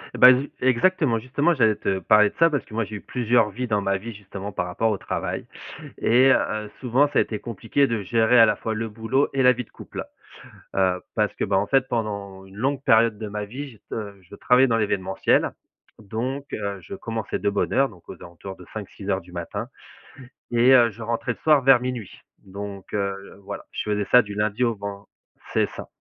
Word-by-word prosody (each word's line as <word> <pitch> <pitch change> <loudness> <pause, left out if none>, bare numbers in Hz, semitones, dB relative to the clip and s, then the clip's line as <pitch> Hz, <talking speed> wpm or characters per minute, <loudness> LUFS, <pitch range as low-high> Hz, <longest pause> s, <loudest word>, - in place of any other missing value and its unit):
Eh - - -5
bah, 125 - +10
ju 135 +3 -2
exactement, 130 -1 +2
justement, 145 +8 +1
j'allais 110 -6 +3
te 95 -1 -1
parler 105 +3 +5
de - - -22
ça, 165 - +6
parce 145 -5 -1
que, 110 - -15
moi, 115 -1 0
j'ai 105 - -8
eu - - -11
plusieurs 120 -3 +1
vies, 125 +5 -4
dans 105 -2 +1
ma 100 -1 0
vie, 115 +4 -8
justement, 100 0 -8
par 90 -1 -2
rapport 100 +6 0
au 105 - -1
travail. - - -4 0.5
Et, 130 +3 +4
heu, 105 -3 -1
souvent, 130 +3 +2
ça - - +2
a - - +6
été 110 - -4
compliqué 120 +5 0
de 115 -4 -2
gérer 115 +4 +3
à 115 - +9
la 105 -1 +1
fois 110 +1 -3
le 115 +1 -3
boulot 115 +6 0
et 135 - +1
la 125 0 +7
vie 125 0 -5
de - - -29
couple. - - -8 0.7
Heu, 95 -1 +2
parce 105 -2 +1
que, - - -1
bah, 95 -1 +1
en 100 +1 0
fait, 135 +2 +2
pendant 100 -5 -4
une 95 0 -16
longue 135 +4 -1
période 110 -1 +4
de 110 0 -5
ma 105 0 -4
vie, 135 +7 -7
j'ai 115 - -16
t - - -54
heu, 100 -3 -6
je 95 +2 -14
travaillais 125 +5 +4
dans 115 -2 +2
l'événementiel, 100 -3 +1 0.5
donc, 120 +7 -4
heu, 100 -2 -3
je - - -10
commençais 115 - -4
de 100 - +1
bonne 100 0 -1
heure, 135 0 +3
donc 90 -5 -18
aux - - -7
alentours 90 +3 -10
de 90 - -13
5:00-6:00 100 -2 -4
du 90 - -17
matin 100 +7 -5 0.8
et 120 +2 +4
heu, 120 -3 +6
je 110 +3 -13
rentrais 115 +2 -2
le - - -21
soir 150 -3 +5
vers 135 -2 +6
00:00. 125 -6 -5 0.2
Donc, 100 0 -8
heu, 100 -1 -3
voilà, 100 +1 -7
je - - -4
faisais 105 -1 -1
ça 125 - +8
du 105 -2 -8
lundi 105 +3 0
au 115 -2 +1
ven 100 0 -7 0.5
c'est - - +3
ça, - - -8
110 Hz, 225 wpm, -24 LUFS, 100-125 Hz, 0.8 s, bah